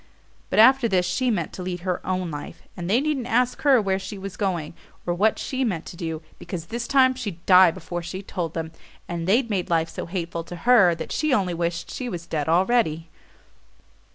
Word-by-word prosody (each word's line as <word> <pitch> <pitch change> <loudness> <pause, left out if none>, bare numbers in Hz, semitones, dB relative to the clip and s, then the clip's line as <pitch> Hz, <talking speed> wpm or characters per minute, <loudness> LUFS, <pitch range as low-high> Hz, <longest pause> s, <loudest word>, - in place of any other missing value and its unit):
But - - -2
after 255 +3 +6
this 185 -4 +2
she 255 +5 0
meant 175 -8 -1
to - - -7
lead 180 -1 -4
her 180 -1 -2
own 185 -2 -2
life; 145 -1 -8
and 175 0 -5
they 225 +5 +4
needn't 280 -4 -1
ask 245 +1 +1
her 275 -4 +5
where 195 -2 0
she 200 +1 -7
was 195 -1 -7
going, 175 -7 -2 0.3
or 175 - 0
what 210 +5 +2
she 265 0 -2
meant 180 -9 -2
to - - -9
do, 165 -2 -5 0.2
because 170 -4 -6
this 235 +5 -4
time 260 -2 +4
she'd 205 -10 -7
die 185 -1 +8
before 175 0 -5
she 185 +3 -6
told 175 -5 -4
them 160 -1 -4 0.4
and 170 0 -4
they'd 230 +4 +2
made 185 -3 -1
life 165 -1 +1
so - - -6
hateful 170 -1 -4
to 175 - -8
her 210 -9 +6
that - - -7
she 305 -4 +1
only 185 -5 0
wished 170 0 -3
she 250 -2 -4
was 170 -4 -6
dead 155 -3 -2
already. 170 -3 +2
185 Hz, 210 wpm, -24 LUFS, 170-230 Hz, 0.4 s, die